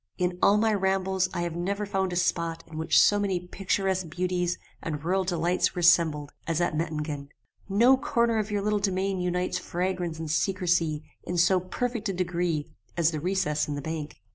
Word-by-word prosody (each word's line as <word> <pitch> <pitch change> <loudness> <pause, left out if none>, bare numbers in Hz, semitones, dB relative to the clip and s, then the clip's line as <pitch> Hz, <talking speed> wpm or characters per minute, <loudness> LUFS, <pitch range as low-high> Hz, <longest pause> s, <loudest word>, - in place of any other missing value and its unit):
In 180 -1 -1
all 205 - +5
my 220 0 +2
rambles 190 -1 +1
I 175 0 -2
never 190 +5 -2
found 190 -2 -1
a - - -3
spot 170 -2 0
in 160 -1 -8
which 160 - +4
so 205 - +5
many 195 -3 0
picturesque 190 -1 -1
beauties 180 0 -1 0.2
and 150 -2 -4
rural 190 +3 +1
delights 175 +1 +1
were 175 - -2
assembled 165 -4 +4 0.2
as 165 -1 0
at 175 -3 0
Mettingen. 150 -3 -3 0.4
No 235 +7 +5
corner 235 -4 +1
of 215 0 -2
your 205 -1 -1
little 210 0 +1
domain 195 -1 0
unites 180 0 -1
fragrance 180 -2 -2
and 160 -1 -4
secrecy 165 -3 +1 0.2
in 175 - -4
so 185 +2 +4
perfect 225 +4 -3
a - - -1
degree 175 -4 -1 0.3
as 170 -1 +3
the 155 - -3
recess 155 -3 0
in 145 - -3
the 145 - -4
bank. 155 -1 -5
180 Hz, 185 wpm, -27 LUFS, 165-195 Hz, 0.4 s, all